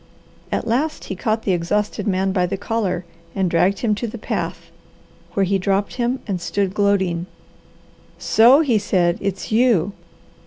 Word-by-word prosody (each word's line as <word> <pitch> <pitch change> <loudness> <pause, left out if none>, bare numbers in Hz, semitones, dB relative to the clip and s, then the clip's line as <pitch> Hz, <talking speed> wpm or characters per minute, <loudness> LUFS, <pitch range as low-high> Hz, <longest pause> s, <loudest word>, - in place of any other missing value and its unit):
At - - -1
last 280 +7 -1
he 190 - -5
caught 220 +4 -1
the 195 - 0
exhausted 205 +4 -1
man 190 0 +1
by 180 -2 +1
the 195 +2 -3
collar 195 -4 -2 0.3
and 190 -3 0
dragged 180 +4 +2
him 225 -3 +2
to 220 +3 -3
the 230 - -7
path, 215 - -4 0.6
where 195 - +3
he 195 +1 +1
dropped 195 +3 -1
him 245 +1 -1
and 190 -5 -3
stood 195 +1 -1
gloating. 190 -4 +1 0.9
"So!" 245 +7 +5
he 245 -9 +2
said; 180 -4 +1
"It's 195 0 -3
you! 220 -5 +3
200 Hz, 160 wpm, -21 LUFS, 185-220 Hz, 0.9 s, So